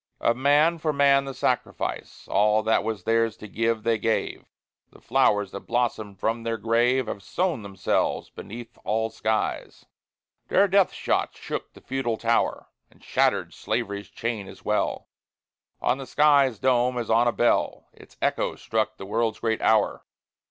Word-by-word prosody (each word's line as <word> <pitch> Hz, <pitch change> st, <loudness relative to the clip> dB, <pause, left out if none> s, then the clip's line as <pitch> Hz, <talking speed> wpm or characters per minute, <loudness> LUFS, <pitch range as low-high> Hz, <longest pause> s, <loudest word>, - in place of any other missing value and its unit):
Of 115 Hz, -, +2 dB
man 145 Hz, +6 st, +3 dB
for 155 Hz, 0 st, 0 dB
man 140 Hz, -1 st, +4 dB
the 135 Hz, -, -5 dB
sacrifice, -, -, -2 dB
All 105 Hz, +1 st, +3 dB
that 110 Hz, 0 st, +2 dB
was 110 Hz, -2 st, -3 dB
theirs 115 Hz, -1 st, +1 dB
to 105 Hz, -, -10 dB
give, 115 Hz, +1 st, -1 dB
they 115 Hz, -1 st, +1 dB
gave. 110 Hz, +1 st, -1 dB, 0.4 s
The -, -, -18 dB
flowers 105 Hz, -2 st, +2 dB
that 100 Hz, -, -9 dB
blossomed 110 Hz, -5 st, -1 dB
from 115 Hz, +3 st, -1 dB
their 115 Hz, 0 st, -2 dB
grave 120 Hz, +4 st, +2 dB
Have 100 Hz, -, -5 dB
sown 170 Hz, -, -1 dB
themselves 100 Hz, -2 st, -1 dB
beneath 120 Hz, +3 st, -10 dB
all 110 Hz, +1 st, -1 dB
skies. 110 Hz, 0 st, -2 dB, 0.6 s
Their 200 Hz, +2 st, +4 dB
death 195 Hz, -1 st, +3 dB
shot -, -, -1 dB
shook -, -, -6 dB
the -, -, -16 dB
feudal 130 Hz, -4 st, -2 dB
tower, 115 Hz, +1 st, 0 dB, 0.2 s
And -, -, -24 dB
shattered -, -, +1 dB
slavery's 100 Hz, +1 st, -3 dB
chain 110 Hz, -4 st, -4 dB
as 95 Hz, -, -13 dB
well; 105 Hz, -, -1 dB, 0.7 s
On 130 Hz, -, +1 dB
the 135 Hz, -, -7 dB
sky's 140 Hz, -5 st, +4 dB
dome, 125 Hz, +1 st, +2 dB
as 120 Hz, -2 st, -2 dB
on 115 Hz, +2 st, +4 dB
a -, -, +4 dB
bell, 120 Hz, 0 st, +1 dB
Its -, -, -18 dB
echo -, -, 0 dB
struck 110 Hz, -1 st, -2 dB
the 95 Hz, -, -8 dB
world's 110 Hz, +2 st, 0 dB
great 110 Hz, -1 st, -1 dB
hour. 110 Hz, -2 st, +2 dB
115 Hz, 160 wpm, -25 LUFS, 110-130 Hz, 0.7 s, man